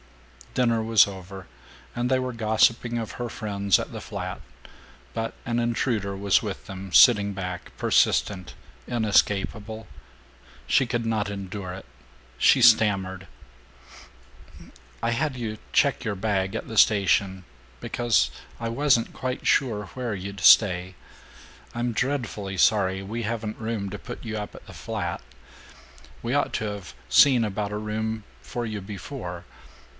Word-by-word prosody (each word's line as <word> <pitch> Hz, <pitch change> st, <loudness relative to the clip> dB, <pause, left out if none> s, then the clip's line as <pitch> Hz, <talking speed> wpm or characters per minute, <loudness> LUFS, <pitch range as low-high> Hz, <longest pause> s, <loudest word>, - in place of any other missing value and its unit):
Dinner 115 Hz, -3 st, +2 dB
was 110 Hz, -2 st, +5 dB
over 95 Hz, -1 st, -9 dB, 0.5 s
and 120 Hz, +1 st, -1 dB
they 130 Hz, -, +3 dB
were 130 Hz, -1 st, -3 dB
gossiping 115 Hz, +1 st, +2 dB
of 115 Hz, -2 st, -4 dB
her 120 Hz, -1 st, -4 dB
friends 100 Hz, -4 st, +1 dB
at -, -, -5 dB
the -, -, -6 dB
flat, -, -, -6 dB, 0.7 s
but 115 Hz, 0 st, -3 dB
an 120 Hz, 0 st, 0 dB
intruder 115 Hz, -4 st, -1 dB
was 100 Hz, 0 st, +3 dB
with -, -, -6 dB
them, 95 Hz, 0 st, -8 dB
sitting 100 Hz, -2 st, +6 dB
back, 90 Hz, -2 st, -6 dB
persistent, 95 Hz, -3 st, +1 dB, 0.3 s
inescapable. 110 Hz, -1 st, 0 dB, 0.8 s
She 135 Hz, -, +3 dB
could 120 Hz, -1 st, -2 dB
not 110 Hz, -2 st, 0 dB
endure 100 Hz, -1 st, -6 dB
it. 95 Hz, -, -9 dB, 0.5 s
She 130 Hz, -, +5 dB
stammered: 100 Hz, -5 st, +4 dB, 1.8 s
"I 115 Hz, -, +1 dB
had 130 Hz, +3 st, -1 dB
you 110 Hz, -3 st, -4 dB
check -, -, +2 dB
your 110 Hz, -, -2 dB
bag 95 Hz, 0 st, -1 dB
at -, -, -4 dB
the 110 Hz, -, -6 dB
station 95 Hz, -3 st, +3 dB, 0.3 s
because 110 Hz, -, +1 dB, 0.3 s
I 115 Hz, -, -3 dB
wasn't 125 Hz, -1 st, +2 dB
quite 125 Hz, 0 st, -4 dB
sure 110 Hz, -7 st, +2 dB
where 125 Hz, -4 st, -3 dB
you'd 100 Hz, +1 st, -7 dB
stay. 90 Hz, 0 st, +5 dB, 0.8 s
I'm 120 Hz, 0 st, -2 dB
dreadfully 110 Hz, -7 st, -2 dB
sorry 95 Hz, -1 st, +3 dB
we 110 Hz, +4 st, -4 dB
haven't 110 Hz, -1 st, -4 dB
room 110 Hz, -3 st, -3 dB
to 105 Hz, -, -6 dB
put -, -, -9 dB
you 110 Hz, -1 st, -4 dB
up 105 Hz, -1 st, -6 dB
at -, -, -13 dB
the -, -, -12 dB
flat. -, -, -4 dB, 1.0 s
We 120 Hz, +2 st, -1 dB
ought 145 Hz, 0 st, +1 dB
to 110 Hz, -, -1 dB
have 100 Hz, -, -6 dB
seen 120 Hz, -, +6 dB
about 105 Hz, 0 st, -3 dB
a 105 Hz, -, -3 dB
room 110 Hz, +1 st, -3 dB, 0.2 s
for 120 Hz, -1 st, -4 dB
you 110 Hz, -2 st, -4 dB
before. 95 Hz, -3 st, -7 dB
110 Hz, 140 wpm, -25 LUFS, 100-115 Hz, 1.8 s, sitting